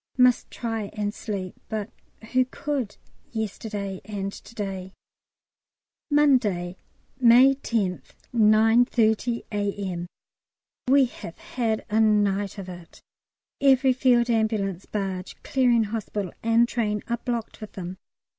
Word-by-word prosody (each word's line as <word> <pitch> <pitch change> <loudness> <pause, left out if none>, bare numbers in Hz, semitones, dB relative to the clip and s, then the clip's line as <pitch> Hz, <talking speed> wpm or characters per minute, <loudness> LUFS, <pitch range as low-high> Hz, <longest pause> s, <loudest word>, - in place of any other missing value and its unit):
Must 250 -1 +4
try 225 -4 -4
and 205 -1 -2
sleep. 195 -4 -5 0.2
But 215 -2 -3 0.4
who 255 0 +3
could 260 -4 -4 0.3
yesterday 205 -3 -4
and 200 -1 -4
to 235 - -13
day? 190 -3 -5 1.2
Monday, 235 - +2 0.4
May 250 +2 +7
10th, 220 -9 -3 0.2
9.30 225 +1 +3
A.M. 200 -4 -2 0.8
We 270 +1 +6
have 170 -8 -9
had 225 -3 -2
a 220 - +3
night 205 -2 +2
of 195 -2 -7
it. 175 -2 -11 0.6
Every 265 -1 +5
Field 245 -2 +3
Ambulance, 210 -5 0
barge, 195 -3 -4
Clearing 245 -4 +3
Hospital, 205 -3 -4
and 230 +1 +4
train 210 -4 -1
are 235 - -1
blocked 235 -1 -4
with 215 - -8
them. 185 0 -7
215 Hz, 115 wpm, -25 LUFS, 195-240 Hz, 1.2 s, May